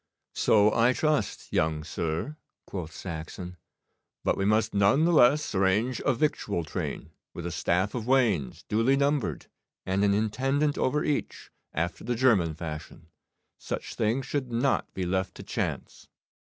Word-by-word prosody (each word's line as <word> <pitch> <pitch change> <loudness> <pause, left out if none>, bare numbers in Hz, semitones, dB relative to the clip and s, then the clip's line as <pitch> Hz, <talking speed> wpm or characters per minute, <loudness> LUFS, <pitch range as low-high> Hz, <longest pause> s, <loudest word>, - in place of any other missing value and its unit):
'So 105 0 +4
I 120 +2 +4
trust, 150 -7 -1
young 80 -1 +1
sir,' 80 - -3 0.3
quoth 85 -5 -6
Saxon, 90 +2 -7 0.7
'but - - +2
we 95 - -1
must 110 +2 +2
none 100 +10 +4
the 175 - +3
less 145 0 +4
arrange 100 +6 +1
a - - +3
victual 115 - -1
train, 80 - -5 0.2
with 85 - -6
a 85 - -3
staff 90 +4 0
of 120 -2 -4
wains, 110 - +1
duly 115 +6 +3
numbered, 140 - 0 0.4
and 95 +2 +1
an 100 -1 +3
intendant 135 +7 +1
over 150 +4 +1
each, 150 - -3 0.2
after 80 +2 -3
the 120 +2 -1
German 105 -11 +3
fashion. 80 0 -8 0.5
Such - - -5
things 115 +5 0
should 130 -2 -3
not 125 +4 0
be 95 - -2
left 95 +1 -1
to - - -9
chance. - - -4
105 Hz, 150 wpm, -28 LUFS, 90-130 Hz, 0.7 s, So